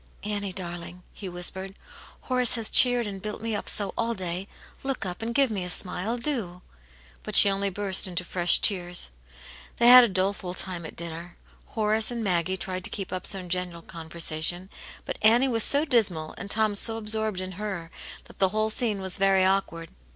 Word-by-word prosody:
"Annie, 205 -1 -3
darling," 175 -1 -9
he 195 - -8
whispered, 190 +2 -3 0.5
"Horace 250 -2 +1
has 225 -2 +1
cheered 245 -2 +6
and 195 -2 -7
built 210 +1 -6
me 225 0 -4
up 205 - -5
so 205 -2 +1
all 230 0 -2
day. 185 +1 -5 0.3
Look 270 -5 -4
up, 180 +1 -6
and 225 +1 -4
give 275 -4 +2
me 195 -4 -4
a 180 - -7
smile, 185 +5 -2
do! 265 0 0 0.3
" - - -32
^ - - -28
But - - -7
she 200 - +10
only 195 0 -1
burst 195 0 +2
into 180 0 -4
fresh 175 0 +4
tears. 175 - +2 0.7
They 240 0 +4
had 250 0 +10
a 240 - +1
doleful 185 -1 -2
time 180 -3 -4
at - - -13
dinner; 170 +1 -8 0.3
Horace 215 0 -1
and 235 -2 -5
Maggie 185 -1 -1
tried 185 -1 -6
to - - +3
keep 195 -2 -7
up 185 - -4
some 190 -2 -2
general 175 -1 -5
conversation^ 165 +2 -1 0.4
but - - -6
Annie 235 +5 +4
was 230 -4 +3
so 285 +2 +3
dismal, 195 - 0
and 200 - -9
Tom 215 0 +1
so 225 +2 +2
absorbed 220 -2 -3
in 185 0 -6
her, 180 -6 -6 0.3
that - - -19
the 190 - +3
whole 215 +2 -1
scene 215 -4 -1
was 190 +1 0
very 195 -1 +2
awkward. 185 -4 -2
195 Hz, 195 wpm, -25 LUFS, 180-220 Hz, 0.7 s, she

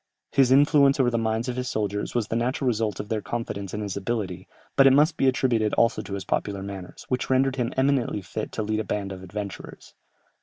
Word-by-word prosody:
His 135 -2 +4
influence 140 0 +5
over 125 -2 +3
the 115 - 0
minds 110 +1 -1
of 125 - -2
his 125 0 -3
soldiers 105 -1 -2
was 115 -3 0
the - - -2
natural 125 +3 0
result 110 -4 0
of - - -4
their 110 -2 -1
confidence 100 -2 -4
in 105 - -4
his 100 -3 -4
ability, 95 -4 -3 0.3
but 135 -1 +7
it 135 - +6
must 150 +4 +4
be 135 - +2
attributed 120 -5 +2
also 115 - +2
to 100 - -8
his 95 -2 -6
popular 100 -2 -2
manners, 95 -2 -8
which 125 -1 -2
rendered 130 0 +2
him 120 -1 -1
eminently 130 -6 +1
fit 105 +4 -5
to 110 - -2
lead 110 +1 -1
a - - -1
band 100 -2 -3
of 95 -1 -7
adventurers. 100 +2 -8
115 Hz, 225 wpm, -25 LUFS, 100-130 Hz, 0.3 s, but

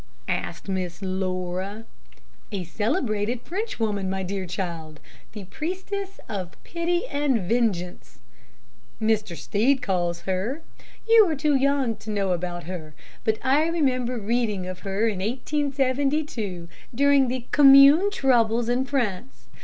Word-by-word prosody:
asked - - -3
Miss 185 -1 -3
Laura. 185 +2 -3 0.7
"A 195 -3 -3
celebrated 215 - -1
Frenchwoman, 225 - -2
my 190 0 -2
dear 190 0 -4
child, 170 -4 -5 0.3
'the 210 -2 -7
priestess 385 +4 -4
of 190 -5 -5
pity 345 +3 -1
and 280 - 0
vengeance,' 200 -6 -1 0.8
Mr. 215 -5 0
Stead 250 +5 +1
calls 175 -4 -1
her. 200 - -2 0.4
You 450 -2 +7
are 315 - 0
too 295 +1 +1
young 270 -3 +2
to 210 - -10
know 200 -3 0
about 175 0 -3
her, 160 -3 -7 0.3
but 220 0 +1
I 285 +4 +3
remember 255 -7 0
reading 215 -3 -1
of 185 0 -6
her 200 +3 -1
in 205 -4 -1
1872, 270 - -1 0.3
during 280 0 +4
the 250 -1 -3
Commune 280 +6 +8
troubles 240 - +2
in 250 +2 +1
France. 190 - -3
225 Hz, 125 wpm, -25 LUFS, 185-275 Hz, 0.8 s, Commune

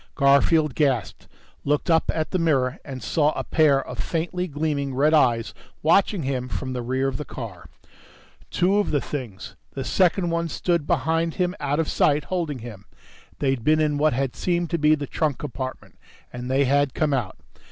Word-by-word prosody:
Garfield 140 +1 +4
gasped, 130 -5 -1 0.4
looked 145 +1 0
up 165 -1 +2
at 155 -1 -3
the 185 - 0
mirror 140 -5 +1
and 130 -4 -8
saw 150 -1 +2
a - - -3
pair 145 -4 +3
of - - -8
faintly 175 +2 -2
gleaming 145 -3 -2
red 150 +4 +3
eyes 120 -7 +3 0.3
watching 185 +2 +3
him 130 -2 -2
from 130 0 -4
the 125 - -3
rear 130 +3 -1
of 130 -2 -2
the - - -4
car. 100 - -8 0.8
Two 190 +3 +2
of 205 - 0
the 145 - +1
things... 125 -10 -6 0.2
the 135 - -4
second 175 +3 +2
one 170 0 -1
stood 170 0 -1
behind 165 +1 0
him 180 -1 0
out 145 +2 -1
of 160 - 0
sight, 145 0 +2
holding 170 -6 -2
him. 100 -5 -10 0.5
They'd 135 -4 -1
been 155 +3 +3
in 150 -2 +1
what 155 0 +3
had 130 0 -2
seemed 175 -2 -1
to 170 - 0
be 150 +1 +4
the 145 -1 -5
trunk 150 0 -1
compartment. 130 -2 -7 0.3
And 125 +1 -6
they 135 +2 +2
had 140 0 +2
come 150 -2 +1
out. 120 -8 -2
145 Hz, 185 wpm, -24 LUFS, 130-160 Hz, 0.8 s, Garfield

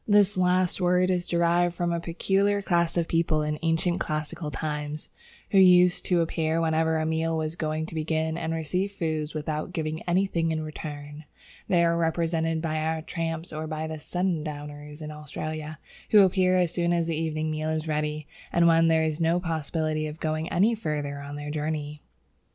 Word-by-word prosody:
This 205 -1 +4
last 185 0 +2
word 180 +1 +3
is 180 -1 -1
derived 170 0 +2
from 175 0 -1
a 170 - 0
peculiar 195 +4 +1
class 170 -2 +1
of 170 -1 +1
people 165 -2 +1
in 150 0 -2
ancient 165 +2 +1
classical 155 +1 -3
times, 150 0 -4 0.4
who 195 - +5
used 180 -1 +6
to 175 -2 +3
appear 160 0 0
whenever 160 0 +2
a 155 - 0
meal 160 0 0
was 155 0 -2
going 155 -1 -2
to 165 - -10
begin, 160 0 -1
and 165 -1 -3
received 180 +5 -2
food 155 -3 -2
without 155 +2 -3
giving 155 -1 -3
anything 175 -2 +1
in 155 -1 -2
return. 150 -1 -7 0.4
They 170 -2 +4
are 170 0 +2
represented 165 -1 0
by 155 -1 -1
our 160 0 -1
tramps 165 0 -4
or 155 +1 -4
by 155 0 -3
the 160 0 -5
"sundowners" 150 -4 -4
in 150 - -6
Australia, 155 +1 -6 0.3
who 210 - +8
appear 185 -1 +4
as 175 -3 +2
soon 175 0 +1
as 170 -1 +1
the 165 -1 -1
evening 155 0 -1
meal 155 0 -2
is 160 0 -2
ready 150 0 -2 0.3
and 170 0 +4
when 165 0 +5
there 160 -1 +3
is 160 +1 -1
no 165 +2 +3
possibility 155 -2 -2
of 155 +1 -8
going 155 +1 -2
any 205 +7 +3
further 150 -9 -3
on 140 0 -7
their 145 0 -5
journey. 150 -1 -3
160 Hz, 185 wpm, -26 LUFS, 155-170 Hz, 0.4 s, who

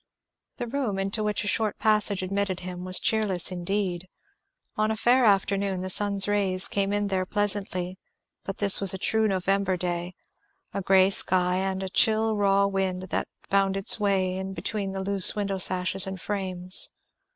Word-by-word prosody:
The - - -4
room 240 -5 -3
into 195 +3 -3
which 210 0 -1
a - - -5
short 215 0 0
passage 210 -3 +2
admitted 195 -1 -2
him 180 0 -7
was 185 0 -1
cheerless 200 -6 0
indeed. 185 0 -3 0.7
On 215 0 0
a 220 - -2
fair 245 +3 +3
afternoon 195 -2 +1
the 185 0 -1
sun's 200 0 +4
rays 195 -2 +1
came 200 0 -1
in 205 0 -1
there 190 -1 -1
pleasantly, 195 -3 -1 0.4
but 195 - -6
this 200 -1 +5
was 195 -1 +3
a - - -4
true 220 +3 +1
November 195 -1 0
day; 175 0 -4 0.6
a 200 - -3
grey 190 0 +3
sky 180 -1 +3
and 190 0 -3
a - - -4
chill 220 +2 +2
raw 200 -1 +2
wind 190 -2 -3
that - - -2 0.2
found 195 0 +1
its 195 +3 +3
way 190 -3 0
in 190 0 -6
between 200 -2 -3
the 190 0 -5
loose 195 -1 +2
window 200 -2 -3
sashes 185 +1 +2
and 190 -1 -6
frames. 185 -1 -3
195 Hz, 175 wpm, -25 LUFS, 185-205 Hz, 0.7 s, this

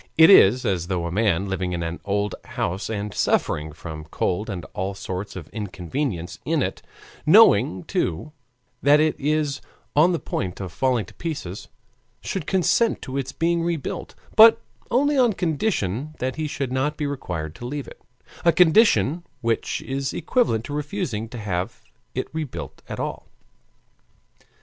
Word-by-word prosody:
It 160 +3 +9
is 125 - +7
as 85 -3 0
though 90 -3 -1
a 85 - -3
man, 100 -1 +1
living 95 -2 -2
in 85 -1 -2
an 85 +1 -4
old 100 0 -1
house 95 +4 -3
and 105 -2 -3
suffering 75 +1 0
from 75 0 -8
cold 90 +6 -2
and 90 -4 -5
all 95 +1 -3
sorts 95 +1 -5
of 85 -5 -7
inconvenience 100 - -4
in - - +1
it, - - -4 0.4
knowing, 90 0 +6
too, 80 - -2 0.5
that 145 +1 +6
it 155 0 +2
is 150 0 0 0.3
on 160 +5 +5
the 170 - +1
point 90 - -4
of 95 -3 -5
falling 125 +3 +1
to - - -15
pieces, 140 - -5 0.5
should 190 -6 -4
consent 190 +5 +2
to 130 - -6
its 135 -1 -2
being 170 +1 +1
rebuilt, 165 -4 -3 0.2
but 225 +1 +9 0.3
only 280 +3 +2
on 245 -2 +5
the 210 - -2
condition 155 - -1
that 130 +1 -2
he 155 -1 -2
should 140 -3 -3
not 145 +3 0
be 150 - -2
required 90 - -4
to 120 - -7
leave 145 +1 -4
it: - - -13 0.4
a 170 - +6
condition 175 - +4 0.2
which 115 -2 -1
is 135 0 -3
equivalent 115 - +1
to 145 - -6
refusing 150 - -3
to 120 - -8
have 105 +1 -3 0.3
it 130 - -1
rebuilt 125 - -5
at - - -5
all. - - -4
125 Hz, 165 wpm, -23 LUFS, 95-155 Hz, 0.5 s, It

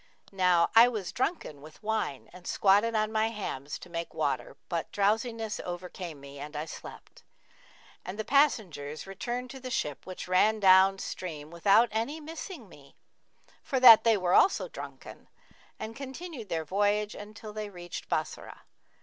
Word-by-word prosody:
Now 180 -3 +3
I 230 +2 +9
was 215 -7 -3
drunken 250 - -3
with 155 +7 -14
wine 215 -11 -2
and 180 0 -12
squatted 205 +4 +3
on 215 0 +1
my 220 0 +2
hams 150 -10 -5
to - - -12
make 170 -1 -5
water; - - -2
but - - -3
drowsiness 220 +2 0
overcame 175 -3 -6
me 140 0 -11
and 150 +2 -8
I 150 +1 -3
slept, - - -11 0.8
and 185 +3 -7
the 220 - -3
passengers 185 - +1
returned 240 +6 -5
to 265 - -9
the 255 0 -7
ship 150 - -3
which 185 -1 -7
ran 210 +4 +3
down 190 0 +6
stream 160 -5 -6
without 200 +7 +4
any 230 +8 -2
missing 320 - -8
me, 140 -6 -17 0.7
for 265 - -1
that 235 -3 +10
they 225 -2 +4
also 185 - +4
were - - -11
drunken, - - -10 0.5
and 225 +1 -7
continued 270 - -8
their 165 -2 -2
voyage 205 +4 +1
until 210 +1 -10
they 215 -1 -5
reached 175 -3 -8
Bassorah. - - -3
205 Hz, 160 wpm, -29 LUFS, 175-230 Hz, 0.8 s, that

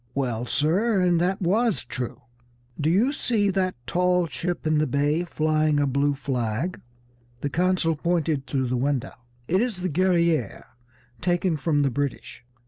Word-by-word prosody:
"Well, 125 -3 -2
sir, 190 - +2
and 175 -2 +3
that 190 +2 0
was 215 +4 +1
true. 125 -2 -5 0.6
Do 150 +1 +1
you 210 +11 +3
see 215 -8 +1
that 185 -1 0
tall 180 0 +2
ship 170 +1 -4
in 155 -1 +2
the 155 - +1
bay 145 +5 +1
flying 155 -2 +1
a 145 - +2
blue 140 +1 +1
flag?" 130 +4 -2 0.6
The 145 - -2
consul 180 0 +1
pointed 160 -3 -1
through 130 -3 -1
the 125 - 0
window. 135 0 -1 0.3
"It 185 +4 +2
is 225 -7 -2
the 185 - 0
Guerrière, 170 - +1 0.6
taken 175 -1 +1
from 145 0 +1
the 135 - +1
British. 140 -1 -4
160 Hz, 155 wpm, -25 LUFS, 140-180 Hz, 0.6 s, and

